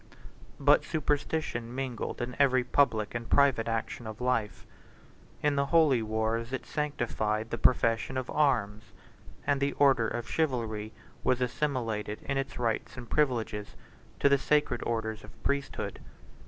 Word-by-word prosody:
But -, -, +5 dB
superstition 145 Hz, -5 st, -2 dB
mingled 130 Hz, -3 st, -3 dB
in 120 Hz, +1 st, -5 dB
every 130 Hz, -3 st, +4 dB
public 120 Hz, -5 st, +2 dB
and 115 Hz, 0 st, -5 dB
private 135 Hz, -5 st, +4 dB
action 115 Hz, 0 st, -3 dB
of 110 Hz, 0 st, -7 dB
life: 110 Hz, -7 st, -1 dB, 0.8 s
in 150 Hz, -1 st, +3 dB
the 140 Hz, 0 st, +2 dB
holy 155 Hz, -7 st, +4 dB
wars, 110 Hz, +2 st, -1 dB
it 130 Hz, -, -4 dB
sanctified 115 Hz, -7 st, -2 dB
the -, -, -2 dB
profession 115 Hz, +1 st, +2 dB
of 130 Hz, -1 st, -2 dB
arms; 110 Hz, -8 st, +1 dB, 0.6 s
and 140 Hz, -1 st, +1 dB
the 140 Hz, 0 st, +1 dB
order 135 Hz, -5 st, +4 dB
of 120 Hz, +1 st, -4 dB
chivalry 115 Hz, -8 st, -1 dB, 0.3 s
was 130 Hz, -, +2 dB
assimilated 120 Hz, -5 st, -2 dB
in 140 Hz, -, -2 dB
its 135 Hz, -1 st, -4 dB
rights 115 Hz, +1 st, -2 dB
and 120 Hz, -1 st, -9 dB
privileges 115 Hz, -8 st, 0 dB, 0.4 s
to -, -, +4 dB
the 140 Hz, 0 st, +4 dB
sacred 150 Hz, -4 st, +1 dB
orders 110 Hz, -1 st, -2 dB
of -, -, -15 dB
priesthood. 140 Hz, 0 st, -2 dB
120 Hz, 140 wpm, -29 LUFS, 110-140 Hz, 0.8 s, But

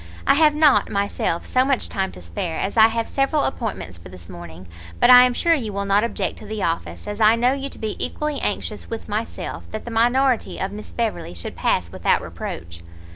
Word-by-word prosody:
I -, -, +5 dB
have 300 Hz, 0 st, +4 dB
not, 300 Hz, -3 st, +4 dB
myself, 200 Hz, -4 st, -1 dB
so 255 Hz, -, +2 dB
much 270 Hz, -1 st, +1 dB
time 190 Hz, -1 st, -2 dB
to 90 Hz, -, -11 dB
spare, 85 Hz, -, -4 dB
as 195 Hz, -, -2 dB
I 220 Hz, -1 st, +7 dB
have 230 Hz, 0 st, -2 dB
several 275 Hz, +2 st, +1 dB
appointments 205 Hz, -, -4 dB
for 85 Hz, -, -12 dB
this 90 Hz, -2 st, -12 dB
morning; 85 Hz, 0 st, -10 dB, 0.3 s
but -, -, +6 dB
I 250 Hz, 0 st, +10 dB
am 250 Hz, -, +1 dB
sure 335 Hz, +5 st, +3 dB
you 240 Hz, -9 st, -1 dB
will 200 Hz, 0 st, -3 dB
not 200 Hz, +2 st, +3 dB
object 235 Hz, -, -3 dB
to 215 Hz, -, -11 dB
the 215 Hz, -2 st, -4 dB
office, 165 Hz, +4 st, -3 dB
as 205 Hz, +1 st, -5 dB
I 215 Hz, +1 st, +6 dB
know 245 Hz, +3 st, +2 dB
you 275 Hz, 0 st, -4 dB
to -, -, -12 dB
be 220 Hz, -1 st, -3 dB
equally 300 Hz, -2 st, -2 dB
anxious 210 Hz, +1 st, -3 dB
with 225 Hz, -1 st, -6 dB
myself, 215 Hz, +2 st, -4 dB
that 215 Hz, -, -6 dB
the 240 Hz, -, -6 dB
minority 245 Hz, +2 st, +2 dB
of 190 Hz, -, -2 dB
Miss 210 Hz, +1 st, -9 dB
Beverley 225 Hz, -, -3 dB
should 85 Hz, -, -6 dB
pass -, -, 0 dB
without -, -, +1 dB
reproach." 85 Hz, +1 st, -7 dB
220 Hz, 220 wpm, -22 LUFS, 190-250 Hz, 0.3 s, I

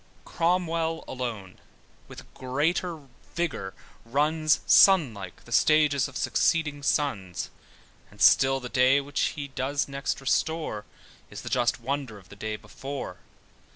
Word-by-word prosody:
Cromwell 165 Hz, -1 st, 0 dB
alone 115 Hz, -7 st, -5 dB, 0.5 s
with -, -, -11 dB
greater 155 Hz, +5 st, -1 dB, 0.3 s
vigour 165 Hz, -, -3 dB, 0.3 s
runs, 150 Hz, +5 st, +1 dB
(Sun 175 Hz, -, +6 dB
like) 95 Hz, -3 st, -10 dB
the 120 Hz, -, -14 dB
stages 145 Hz, +1 st, +3 dB
of 135 Hz, -, -8 dB
succeeding 150 Hz, -3 st, +1 dB
suns: 110 Hz, -, -1 dB, 0.6 s
And -, -, -19 dB
still 135 Hz, 0 st, +5 dB
the 125 Hz, -, -6 dB
day 130 Hz, +2 st, +4 dB
which 140 Hz, 0 st, -2 dB
he 140 Hz, -1 st, -5 dB
doth 140 Hz, +2 st, -2 dB
next 140 Hz, 0 st, -3 dB
restore, 135 Hz, -5 st, -1 dB, 0.4 s
Is -, -, -9 dB
the -, -, -5 dB
just 120 Hz, -1 st, +1 dB
wonder 130 Hz, -2 st, -4 dB
of 95 Hz, -2 st, -17 dB
the -, -, -12 dB
day 110 Hz, +1 st, -4 dB
before. 135 Hz, +5 st, -7 dB
140 Hz, 130 wpm, -27 LUFS, 120-155 Hz, 0.6 s, Sun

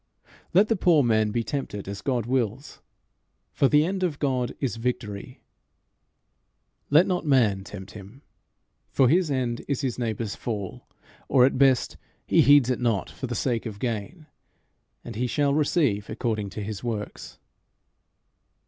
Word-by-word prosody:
Let 195 Hz, +5 st, +5 dB
the 225 Hz, -, +2 dB
poor 170 Hz, -6 st, +4 dB
man 110 Hz, -2 st, +2 dB
be 115 Hz, +2 st, -1 dB
tempted 110 Hz, -8 st, -4 dB
as 100 Hz, 0 st, -6 dB
God 125 Hz, -5 st, -1 dB
wills, 125 Hz, +1 st, -2 dB, 0.7 s
for 140 Hz, -, +3 dB
the 150 Hz, +2 st, +4 dB
end 190 Hz, +2 st, -2 dB
of 170 Hz, -6 st, -1 dB
God 130 Hz, -4 st, -1 dB
is 130 Hz, -4 st, -2 dB
victory; 115 Hz, -1 st, -4 dB, 1.5 s
let 155 Hz, +5 st, +6 dB
not 180 Hz, -2 st, -1 dB
man 115 Hz, -, +2 dB
tempt 95 Hz, -1 st, -9 dB
him, 105 Hz, +7 st, -12 dB, 0.7 s
for 130 Hz, -, +3 dB
his 175 Hz, +2 st, +3 dB
end 125 Hz, -4 st, -1 dB
is 140 Hz, -2 st, -1 dB
his 130 Hz, -3 st, -2 dB
neighbour's 110 Hz, -3 st, -2 dB
fall, 105 Hz, -5 st, -5 dB, 0.4 s
or 125 Hz, -2 st, +6 dB
at 130 Hz, -1 st, 0 dB
best 135 Hz, -3 st, +3 dB, 0.3 s
he -, -, +4 dB
heeds 140 Hz, -3 st, +6 dB
it 125 Hz, -, -1 dB
not 115 Hz, -5 st, 0 dB
for 130 Hz, -, -6 dB
the 120 Hz, -, -4 dB
sake 120 Hz, 0 st, -1 dB
of 105 Hz, -2 st, -7 dB
gain, 120 Hz, -, -4 dB, 0.8 s
and -, -, -8 dB
he 125 Hz, +2 st, 0 dB
shall 140 Hz, +2 st, +1 dB
receive 140 Hz, -, +1 dB
according 110 Hz, -2 st, -2 dB
to 105 Hz, +2 st, -6 dB
his 105 Hz, 0 st, -6 dB
works. 110 Hz, -4 st, -5 dB
125 Hz, 155 wpm, -25 LUFS, 110-140 Hz, 1.5 s, let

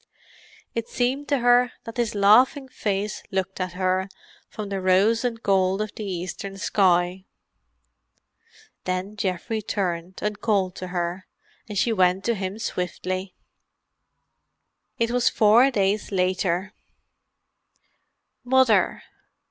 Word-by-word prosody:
It 230 Hz, -1 st, -3 dB
seemed 260 Hz, +4 st, -1 dB
to 285 Hz, -, +2 dB
her 245 Hz, 0 st, +4 dB
that 230 Hz, -, -9 dB
his 235 Hz, -3 st, -1 dB
laughing 245 Hz, +7 st, +4 dB
face 205 Hz, -4 st, -3 dB
looked 190 Hz, 0 st, -3 dB
at 180 Hz, -1 st, -3 dB
her 185 Hz, +1 st, 0 dB, 0.4 s
from 210 Hz, -2 st, -6 dB
the 195 Hz, -1 st, -3 dB
rose 195 Hz, +5 st, +3 dB
and 235 Hz, -2 st, -2 dB
gold 190 Hz, 0 st, +2 dB
of 215 Hz, -1 st, -3 dB
the 215 Hz, -, -7 dB
eastern 195 Hz, +1 st, -5 dB
sky. 185 Hz, -1 st, +1 dB, 1.6 s
Then 185 Hz, +3 st, -3 dB
Geoffrey 200 Hz, +2 st, -2 dB
turned, 185 Hz, -3 st, -3 dB
and 210 Hz, 0 st, -2 dB
called 195 Hz, -5 st, +1 dB
to 185 Hz, -, -5 dB
her, 175 Hz, +1 st, -3 dB, 0.4 s
and 205 Hz, -, -4 dB
she 230 Hz, +4 st, +2 dB
went 185 Hz, -1 st, +2 dB
to 235 Hz, -, +1 dB
him 195 Hz, -1 st, -4 dB
swiftly. 185 Hz, -2 st, -4 dB, 1.6 s
It 230 Hz, 0 st, 0 dB
was 245 Hz, -1 st, +3 dB
four 225 Hz, +5 st, +5 dB
days 205 Hz, -3 st, 0 dB
later. 185 Hz, 0 st, 0 dB, 1.7 s
"Mother." 245 Hz, -5 st, +3 dB
195 Hz, 120 wpm, -24 LUFS, 185-225 Hz, 1.7 s, four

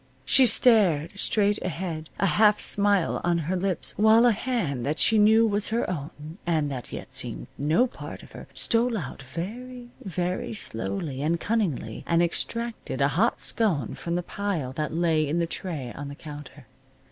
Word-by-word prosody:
She 260 Hz, -2 st, +5 dB
stared 200 Hz, -, +4 dB
straight 205 Hz, -1 st, +2 dB
ahead, 165 Hz, -2 st, -4 dB
a -, -, +2 dB
half 210 Hz, +2 st, +4 dB
smile 200 Hz, -3 st, +1 dB
on 175 Hz, -1 st, +2 dB
her 170 Hz, +3 st, -2 dB
lips, 185 Hz, -1 st, -2 dB
while 220 Hz, +3 st, +6 dB
a 240 Hz, -, +6 dB
hand 210 Hz, -, -2 dB
that 150 Hz, +4 st, -1 dB
she 220 Hz, -, +4 dB
knew 220 Hz, +2 st, +6 dB
was 205 Hz, -1 st, 0 dB
her 230 Hz, +2 st, -1 dB
own, 155 Hz, +1 st, -7 dB
and 155 Hz, -4 st, 0 dB
that 125 Hz, -3 st, -6 dB
yet -, -, -8 dB
seemed -, -, -3 dB
no 155 Hz, -, +2 dB
part 255 Hz, -, -9 dB
of -, -, -15 dB
her, -, -, -11 dB
stole 230 Hz, 0 st, +2 dB
out, 140 Hz, -6 st, -6 dB
very, 240 Hz, -, -7 dB
very 180 Hz, +2 st, -3 dB
slowly, 120 Hz, -, -3 dB
and 165 Hz, +3 st, 0 dB
cunningly, 165 Hz, -, -2 dB
and 170 Hz, 0 st, +3 dB
extracted 230 Hz, +7 st, -2 dB
a -, -, +3 dB
hot -, -, +1 dB
scone 170 Hz, -, +1 dB
from 170 Hz, 0 st, -4 dB
the 175 Hz, -, -1 dB
pile 175 Hz, -10 st, -3 dB
that 150 Hz, +1 st, -3 dB
lay 160 Hz, -2 st, +1 dB
in 155 Hz, +4 st, -1 dB
the 170 Hz, -, +1 dB
tray 160 Hz, -8 st, -4 dB
on 145 Hz, +1 st, -6 dB
the 140 Hz, -, -8 dB
counter. 145 Hz, -2 st, -11 dB
175 Hz, 175 wpm, -26 LUFS, 150-215 Hz, -, while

